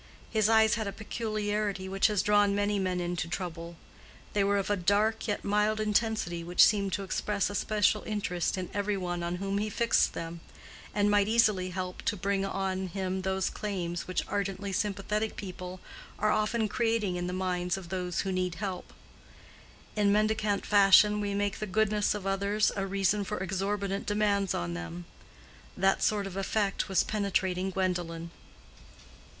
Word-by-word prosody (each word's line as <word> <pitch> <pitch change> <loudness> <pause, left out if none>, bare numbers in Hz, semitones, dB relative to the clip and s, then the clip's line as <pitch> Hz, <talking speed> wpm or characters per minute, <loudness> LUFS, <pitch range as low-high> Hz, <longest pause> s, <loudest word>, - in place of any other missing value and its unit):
His 215 -1 +2
eyes 220 -1 +5
had 220 -2 -1
a - - -2
peculiarity 210 -2 -2
which 195 +2 +2
has 210 -3 +1
drawn 205 -1 +4
many 205 0 +1
men 185 -1 -1
into 175 -2 -2
trouble; 170 -1 -5 0.6
they 205 - +2
were 200 +1 +2
of 200 +1 -1
a - - +3
dark 205 +5 +1
yet 205 - -2
mild 210 +1 +1
intensity 210 -5 0
which 175 +1 +5
seemed 200 -3 +1
to 200 - -1
express 200 +1 -1
a - - -6
special 210 0 +2
interest 195 -5 -2
in 185 -1 -4
every 205 0 0
one 175 -2 -3
on 170 +1 -2
whom 195 +2 -2
he 215 +1 -1
fixed 230 +2 +2
them, 165 0 -6 0.5
and 205 0 +2
might 205 -1 +4
easily 215 -5 +3
help 185 0 -5
to 210 - 0
bring 195 +1 0
on 190 -1 -2
him 190 +1 -3
those 190 0 -1
claims 180 -5 -4
which 185 - -1
ardently 200 -1 -2
sympathetic 210 +2 -1
people 185 -1 -7 0.4
are 215 - +2
often 215 +1 +1
creating 225 -3 0
in 175 0 -2
the - - -3
minds 180 -1 -1
of 185 -3 -9
those 180 -2 -2
who 195 - -2
need 185 -1 -1
help. 190 0 -5 1.0
In 205 -2 +3
mendicant 215 -1 +1
fashion 210 +1 +6
we 200 -1 -2
make 205 0 -1
the 215 - -3
goodness 210 +1 +1
of 205 -2 -6
others 200 +2 +1
a 195 -1 -2
reason 195 +1 +1
for - - -4
exorbitant 195 +1 -2
demands 205 -2 +1
on 85 0 -2
them. 85 +1 -6 0.7
That 195 +1 +2
sort 210 -2 +1
of 195 -2 -7
effect 200 +1 0
was 190 -2 +3
penetrating 190 -3 0
Gwendolen. 175 -3 -2
200 Hz, 170 wpm, -29 LUFS, 185-210 Hz, 1.0 s, fashion